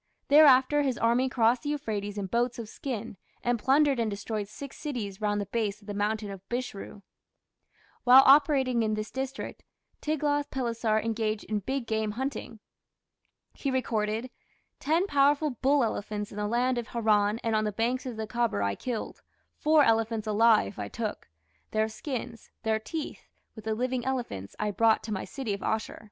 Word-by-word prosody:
Thereafter 285 -1 +6
his 265 -4 0
army 240 +3 +2
crossed 235 0 +2
the 290 - -4
Euphrates 210 -8 -3
in 200 - -2
boats 235 +5 0
of 230 -2 -6
skin, 230 -3 -5 0.3
and 240 -1 +1
plundered 275 +2 +3
and 225 -2 +1
destroyed 205 +1 -4
six 275 +6 -9
cities 225 -9 -5
round 205 -1 +1
the 205 - -2
base 210 0 -2
of 205 - -20
the 205 - -5
mountain 210 0 -1
of 195 -2 -8
Bishru. 240 -4 -5 1.0
While 255 +2 +9
operating 270 -4 +5
in 215 -1 +1
this 215 0 -5
district, 265 +1 -5 0.4
Tiglath 290 -1 0
pileser 230 -4 0
engaged 220 -1 -1
in 215 -1 -2
big 260 +5 -3
game 220 -1 -1
hunting. 255 -2 -4 0.9
He 280 - -3
recorded: 230 -2 -1 0.5
"Ten 325 +6 +2
powerful 290 -2 +3
bull 270 +3 +2
elephants 210 -2 -3
in 205 - -9
the 210 0 -1
land 245 +2 +1
of 235 - -6
Haran 215 -2 +2
and 225 -1 +1
on 215 - +2
the 210 - 0
banks 240 +5 -1
of 240 -3 -5
the 220 - -3
Khabour 230 - 0
I 100 0 +1
killed; 240 - -5 0.4
four 305 0 +5
elephants 225 -2 +1
alive 215 - +3
I 100 - -3
took. 215 - -5 0.4
Their 215 0 +1
skins, 235 0 -6
their 220 -1 +1
teeth, 310 +8 -6 0.3
with 220 -2 -12
the 220 -1 0
living 250 +1 -1
elephants, 240 - -4
I 210 0 -1
brought 225 +2 +3
to 215 - -4
my 190 - -3
city 260 -7 -4
of 200 - -5
Asshur." 220 0 -2
230 Hz, 175 wpm, -28 LUFS, 215-260 Hz, 1.0 s, While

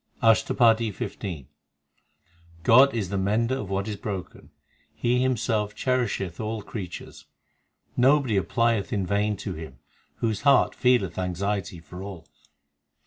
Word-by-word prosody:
ASHTAPADI 115 0 +4
XV - - -6
i 80 -9 -5 1.2
God 130 +6 +6
is 100 -6 -2
the 100 0 -1
mender 110 +6 +1
of 105 - -6
what 100 +1 -2
is 105 -2 -4
broken; 100 -2 -6 0.5
He 125 +1 +1
Himself 110 -5 0
cherisheth 120 -9 -1
all 110 -1 -3
creatures. 95 -6 -8 0.7
Nobody 130 -2 +3
applieth 115 +2 +1
in 100 -3 0
vain 105 +2 0
to 95 - -5
Him 80 -5 -9 0.4
Whose 110 -3 -2
heart 140 -2 +4
feeleth 125 -8 +2
anxiety 95 0 -2
for 85 +3 -10
all. 95 -4 -8
105 Hz, 130 wpm, -26 LUFS, 95-115 Hz, 1.2 s, God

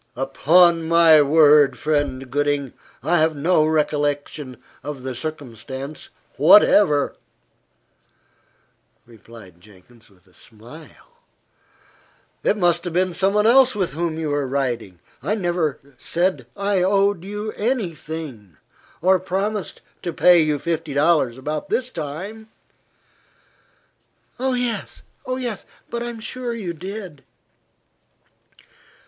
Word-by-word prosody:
"Upon 165 +6 +3
my 165 -2 +6
word, 145 -2 +5
friend 140 -4 -2
Gooding, 145 -2 -1 0.3
I 170 +4 +2
have 160 0 +2
no 155 +1 +2
recollection 145 -3 -1 0.2
of 140 -2 -7
the 130 0 -4
circumstance 135 +1 -6 0.3
whatever," 150 -2 +5 1.9
replied 110 -6 -16
Jenkins 105 +4 -20
with 95 -2 -27
a 90 - -26
smile. 150 - -15 1.2
"It 215 - +1
must 175 -3 +2
have 175 - -4
been 180 +1 +1
some 195 +3 0
one 210 0 +3
else 255 +1 +5
with 185 -8 -2
whom 165 0 -2
you 160 -2 -3
were 145 -1 -1
riding. 120 -8 -3 0.2
I 190 +11 -1
never 175 -7 -1 0.2
said 170 -8 -1
I 200 -1 0
owed 195 -1 +2
you 210 +2 -5
any 220 -6 -2
thing, 140 - -8 0.5
or 185 +1 +4
promised 195 +1 -3 0.2
to 175 - -3
pay 175 +1 +5
you 155 -1 +1
fifty 165 -2 -3
dollars 145 -5 +2
about 150 +3 -5
this 255 0 -1
time." 185 +9 -7 1.9
"Oh, 260 0 0
yes! 245 -2 -3 0.9
but 235 - -3
I 240 - -3
am 235 -1 -7
sure 245 +2 -5
you 190 -7 -5
did." 185 -3 -8
160 Hz, 115 wpm, -21 LUFS, 140-190 Hz, 1.9 s, my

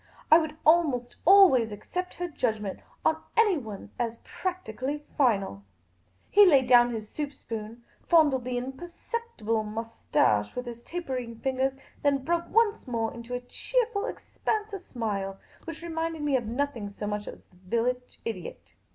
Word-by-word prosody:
I 315 - +10
would 315 -1 -4
almost 300 -7 +3
always 345 - +7
accept 360 - -5
her 355 - -3
judgment 220 - -2 0.3
on 320 0 +2 0.2
anyone 295 - +1
as 235 -1 -1
practically 295 - -4
final." 195 - +1 0.7
He 410 - +8
laid 280 -9 +6
down 245 -1 +6
his 220 -2 -5
soup 290 +4 -4
spoon, 230 -3 -7 0.2
fondled 295 -7 +5
the 250 0 -2
imperceptible 265 - -3
moustache 215 - 0
with 250 - -3
his 235 -1 -7
tapering 255 -8 -4
fingers, 265 0 +1 0.3
and 285 -1 +4
then 270 - -12
broke 340 0 0
once 440 -7 +2
more 230 -2 -1
into 235 +1 -6
a 245 - -3
cheerful 460 - -1
expanse 430 -3 -3
of 390 - -4
smile 205 - -3 0.3
which 330 0 -7
reminded 325 -2 -3
me 290 -2 +2
of 240 -4 0
nothing 240 -3 -2
so 200 +1 -6
much 210 0 -3
as - - -6
of - - -24
the 180 - -22
village 250 +4 -1
idiot. 195 -7 -6
255 Hz, 155 wpm, -28 LUFS, 225-330 Hz, 0.7 s, I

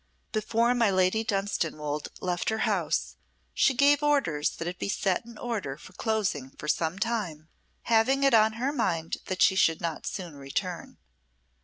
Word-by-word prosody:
Before 230 +2 +1
my 235 -4 +3
Lady 190 +3 +2
Dunstanwolde 165 -8 -2
left 180 -1 -1
her 220 0 0
house - - -1 0.4
she 265 - +3
gave 285 +3 +5
orders 275 - +2
that 165 - -5
it 180 +1 -5
be - - -3
set 195 +1 0
in 235 -2 -12
order 205 - -3
for 185 - -14
closing 190 - -1
for 150 - -7
some 160 +3 0
time, 195 -9 -3 0.3
having 235 +5 +3
it 275 -2 +4
on 220 -1 +5
her 250 +5 -1
mind 165 - -1
that 185 -1 +1
she 190 - +5
should 165 -4 +3
not 165 -2 -4
soon 180 -5 -5
return. 165 +6 -4
195 Hz, 165 wpm, -28 LUFS, 165-230 Hz, 0.4 s, gave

